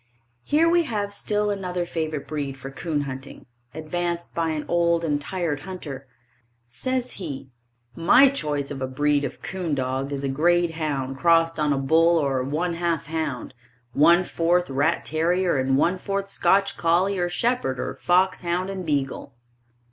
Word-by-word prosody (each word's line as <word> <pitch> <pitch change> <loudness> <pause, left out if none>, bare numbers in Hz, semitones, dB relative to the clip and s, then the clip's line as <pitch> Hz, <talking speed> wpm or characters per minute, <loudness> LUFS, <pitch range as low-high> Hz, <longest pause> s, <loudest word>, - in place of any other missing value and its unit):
Here 315 +3 +3
we 345 +1 +4
have 205 -6 -2
still 210 0 0
another 180 -3 -2
favorite 155 -4 -3
breed 140 -2 -4
for 135 +1 -8
'coon 150 +2 -2
hunting, 135 -1 -7 0.3
advanced 170 +3 -3
by 165 -1 0
an 155 -1 -3
old 170 -1 +2
and 145 -2 0
tried 165 -2 -2
hunter. 145 -6 -8 0.6
Says 250 - -3
he: 135 -4 -6 0.4
My 185 +11 +6
choice 150 - -2
of 135 -2 -6
a 130 - -1
breed 145 +2 +1
of 140 - -6
coon 175 -4 -2
dog 130 +1 -2
is 140 -1 -3
a - - 0
grade 170 +5 +2
hound 140 -4 -3
crossed 165 0 +3
on 150 -1 +2
a 140 - +2
bull 165 +5 +4
or 135 -4 +1
one 155 +7 -1
half 170 -2 -1
hound, 155 -7 -4 0.4
one 170 +5 +5
fourth 175 -2 +1
rat 145 +5 +1
terrier 170 0 +1
and 130 0 +2
one 175 +6 +2
fourth 195 +1 -3
Scotch 195 0 +2
collie 180 +4 +2
or 175 0 0
shepherd 175 - 0
or - - -3
fox 185 +1 +2
hound 180 +2 -1
and 190 -1 -5
beagle. 140 -4 -2
165 Hz, 165 wpm, -24 LUFS, 140-180 Hz, 0.6 s, My